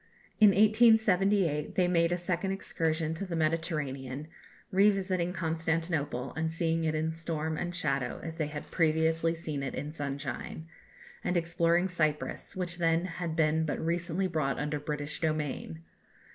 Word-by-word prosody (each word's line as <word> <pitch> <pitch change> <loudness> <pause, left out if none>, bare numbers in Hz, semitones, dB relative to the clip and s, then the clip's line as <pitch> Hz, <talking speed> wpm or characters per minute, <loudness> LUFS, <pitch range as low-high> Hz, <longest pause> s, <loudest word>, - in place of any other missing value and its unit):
In 215 -2 +9
1878 200 -6 +4
they 180 -1 +3
made 170 -1 +3
a 175 - +1
second 180 +2 -1
excursion 160 -4 -1
to 170 +5 -4
the 170 - -3
Mediterranean, 155 -4 -2 0.4
revisiting 190 -3 +2
Constantinople, 165 -5 -1
and 160 +1 -1
seeing 165 0 0
it 155 0 0
in 160 +1 0
storm 160 -1 -3
and 175 +2 -3
shadow 140 -7 -1
as 165 0 -6
they 155 -3 0
had 145 0 -7
previously 160 0 +2
seen 155 -4 -4
it 135 - -4
in 150 +1 -4
sunshine; 145 +1 -5 0.6
and 180 - +1
exploring 170 +1 +2
Cyprus, 155 0 -2
which 180 -1 -3
then 165 +1 +2
had 170 -2 -4
been 160 0 +2
but 155 - -2
recently 170 +2 -1
brought 155 -6 0
under 150 +1 -2
British 150 0 -3
dominion. 150 - -2
165 Hz, 145 wpm, -30 LUFS, 155-175 Hz, 0.6 s, In